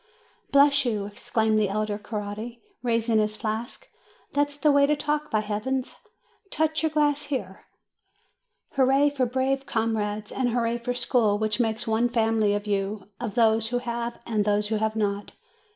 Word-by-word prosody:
"Bless 280 Hz, 0 st, +5 dB
you!" 215 Hz, -5 st, -1 dB
exclaimed 215 Hz, +1 st, 0 dB
the 210 Hz, -2 st, +1 dB
elder 210 Hz, 0 st, -2 dB
Coretti, 215 Hz, +2 st, -6 dB, 0.2 s
raising 230 Hz, -2 st, +2 dB
his 215 Hz, 0 st, 0 dB
flask; 220 Hz, +3 st, -4 dB, 0.5 s
"that's 290 Hz, 0 st, 0 dB
the 300 Hz, 0 st, +3 dB
way 280 Hz, 0 st, +5 dB
to 300 Hz, -, +3 dB
talk, 300 Hz, +1 st, -2 dB
by 215 Hz, -, +1 dB
Heavens! 225 Hz, +5 st, -2 dB, 0.5 s
Touch 315 Hz, -1 st, 0 dB
your 320 Hz, -, +1 dB
glass 295 Hz, -1 st, +1 dB
here! 210 Hz, -10 st, -5 dB, 1.1 s
Hurrah 270 Hz, +2 st, +4 dB
for 265 Hz, -3 st, 0 dB
brave 265 Hz, +2 st, -1 dB
comrades, 215 Hz, -2 st, -1 dB
and 255 Hz, -2 st, 0 dB
hurrah 235 Hz, 0 st, 0 dB
for 245 Hz, +1 st, -3 dB
school, 225 Hz, -4 st, +2 dB
which 215 Hz, +1 st, -1 dB
makes 220 Hz, -2 st, 0 dB
one 225 Hz, +2 st, +1 dB
family 220 Hz, -3 st, +2 dB
of 205 Hz, 0 st, -3 dB
you, 200 Hz, 0 st, -2 dB
of 230 Hz, -4 st, -4 dB
those 225 Hz, -1 st, +3 dB
who 245 Hz, +2 st, -1 dB
have 235 Hz, -1 st, -4 dB
and 215 Hz, -3 st, 0 dB
those 210 Hz, 0 st, +1 dB
who 220 Hz, -, +1 dB
have 220 Hz, 0 st, -1 dB
not!" 205 Hz, -1 st, -2 dB
230 Hz, 165 wpm, -26 LUFS, 215-265 Hz, 1.1 s, Bless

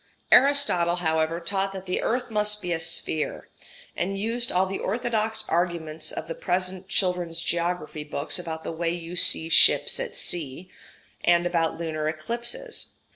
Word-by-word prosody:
] -, -, -39 dB
Aristotle, 265 Hz, -12 st, +5 dB
however, 160 Hz, -1 st, 0 dB
taught 195 Hz, +3 st, -2 dB
that 190 Hz, -1 st, -7 dB
the 180 Hz, -, -2 dB
earth 245 Hz, 0 st, -2 dB
must 210 Hz, 0 st, +1 dB
be 180 Hz, -3 st, -3 dB
a 165 Hz, -, -2 dB
sphere, 160 Hz, -1 st, -3 dB, 0.5 s
and 195 Hz, +3 st, -2 dB
used 230 Hz, +4 st, +1 dB
all 185 Hz, +1 st, +2 dB
the 195 Hz, +1 st, -4 dB
orthodox 220 Hz, 0 st, -1 dB
arguments 165 Hz, -2 st, -1 dB
of -, -, -6 dB
the 165 Hz, -, -4 dB
present 185 Hz, +2 st, -2 dB
children's 180 Hz, -4 st, 0 dB
geography 170 Hz, -3 st, -2 dB
books 150 Hz, +2 st, -2 dB
about 160 Hz, -2 st, -6 dB
the -, -, -4 dB
way 165 Hz, +1 st, -2 dB
you 170 Hz, 0 st, -5 dB
see 160 Hz, -2 st, +5 dB
ships 165 Hz, -, +5 dB
at -, -, -5 dB
sea, 170 Hz, +2 st, -2 dB, 0.5 s
and 175 Hz, 0 st, +4 dB
about 170 Hz, -2 st, 0 dB
lunar 155 Hz, -2 st, -3 dB
eclipses. 235 Hz, -, -3 dB
175 Hz, 160 wpm, -25 LUFS, 165-205 Hz, 0.5 s, Aristotle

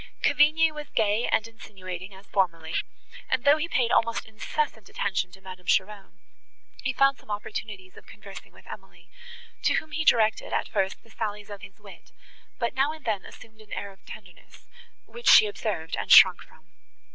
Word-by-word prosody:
Cavigni 315 Hz, +2 st, +4 dB
was 300 Hz, -1 st, -9 dB
gay 215 Hz, +1 st, +1 dB
and 220 Hz, -, +1 dB
insinuating 190 Hz, -4 st, -9 dB
as 195 Hz, +1 st, -15 dB
formerly; 165 Hz, -4 st, -1 dB, 0.6 s
and, 245 Hz, -, 0 dB
though 285 Hz, +2 st, +5 dB
he 310 Hz, +2 st, -2 dB
paid 245 Hz, -7 st, 0 dB
almost 230 Hz, 0 st, +1 dB
incessant 220 Hz, +1 st, -4 dB
attention 185 Hz, -2 st, -2 dB
to 190 Hz, 0 st, -16 dB
Madame 185 Hz, -1 st, -11 dB
Cheron, 195 Hz, 0 st, -1 dB, 0.7 s
he 260 Hz, -, 0 dB
found 275 Hz, +1 st, +2 dB
some -, -, -22 dB
opportunities 205 Hz, -2 st, -6 dB
of -, -, -16 dB
conversing -, -, -12 dB
with -, -, -19 dB
Emily, -, -, -13 dB, 0.5 s
to -, -, +2 dB
whom 315 Hz, -, -3 dB
he 315 Hz, +2 st, -2 dB
directed, 220 Hz, -6 st, +2 dB
at -, -, 0 dB
first, 190 Hz, 0 st, -2 dB
the 230 Hz, -, -21 dB
sallies 210 Hz, -2 st, -5 dB
of 200 Hz, -1 st, -8 dB
his 195 Hz, +2 st, -13 dB
wit, 205 Hz, -2 st, -15 dB, 0.5 s
but 235 Hz, -, -2 dB
now 270 Hz, +3 st, +1 dB
and 315 Hz, -1 st, -12 dB
then 210 Hz, -4 st, -1 dB
assumed 220 Hz, -1 st, -15 dB
an 215 Hz, -, -13 dB
air 200 Hz, 0 st, -5 dB
of 195 Hz, 0 st, -22 dB
tenderness, 190 Hz, -4 st, -14 dB, 0.4 s
which 475 Hz, -, -2 dB
she -, -, +9 dB
observed, 205 Hz, -6 st, -4 dB
and -, -, -4 dB
shrunk -, -, +8 dB
from. -, -, -18 dB
215 Hz, 180 wpm, -26 LUFS, 195-245 Hz, 0.7 s, she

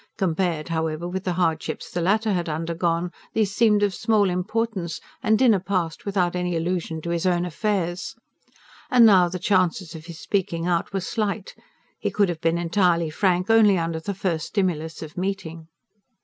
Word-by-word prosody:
Compared, 170 Hz, -3 st, -1 dB
however, 160 Hz, 0 st, -2 dB
with 190 Hz, +1 st, -4 dB
the 180 Hz, -, 0 dB
hardships 165 Hz, -3 st, -1 dB
the 175 Hz, -, -2 dB
latter 210 Hz, +4 st, +2 dB
had 175 Hz, -2 st, -1 dB
undergone, 170 Hz, +2 st, -1 dB, 0.2 s
these 210 Hz, -3 st, +1 dB
seemed 210 Hz, -2 st, +3 dB
of 200 Hz, -2 st, +2 dB
small 205 Hz, 0 st, +2 dB
importance; 190 Hz, -2 st, -2 dB, 0.2 s
and 220 Hz, 0 st, +3 dB
dinner 225 Hz, -5 st, +4 dB
passed 180 Hz, -2 st, -2 dB
without 180 Hz, -3 st, +1 dB
any 180 Hz, -1 st, -1 dB
allusion 165 Hz, -1 st, -2 dB
to 170 Hz, -, -3 dB
his 170 Hz, +2 st, 0 dB
own 175 Hz, -1 st, +1 dB
affairs. 180 Hz, 0 st, -2 dB, 0.7 s
And 245 Hz, -2 st, +7 dB
now 185 Hz, -5 st, +6 dB
the 185 Hz, -, -4 dB
chances 185 Hz, -2 st, +1 dB
of 160 Hz, 0 st, -10 dB
his 165 Hz, -2 st, -9 dB
speaking 175 Hz, -4 st, -1 dB
out 175 Hz, -2 st, 0 dB
were 195 Hz, -1 st, -2 dB
slight; 205 Hz, 0 st, -3 dB, 0.5 s
he -, -, -1 dB
could 205 Hz, -3 st, +2 dB
have 165 Hz, -2 st, -4 dB
been 165 Hz, +1 st, +2 dB
entirely 170 Hz, -1 st, +1 dB
frank 185 Hz, +4 st, +1 dB
only 215 Hz, -4 st, +6 dB
under 165 Hz, -1 st, -2 dB
the 200 Hz, +5 st, -4 dB
first 170 Hz, -5 st, -2 dB
stimulus 165 Hz, -6 st, -2 dB
of 155 Hz, +3 st, -8 dB
meeting. 170 Hz, -4 st, -4 dB
180 Hz, 175 wpm, -24 LUFS, 165-200 Hz, 0.7 s, And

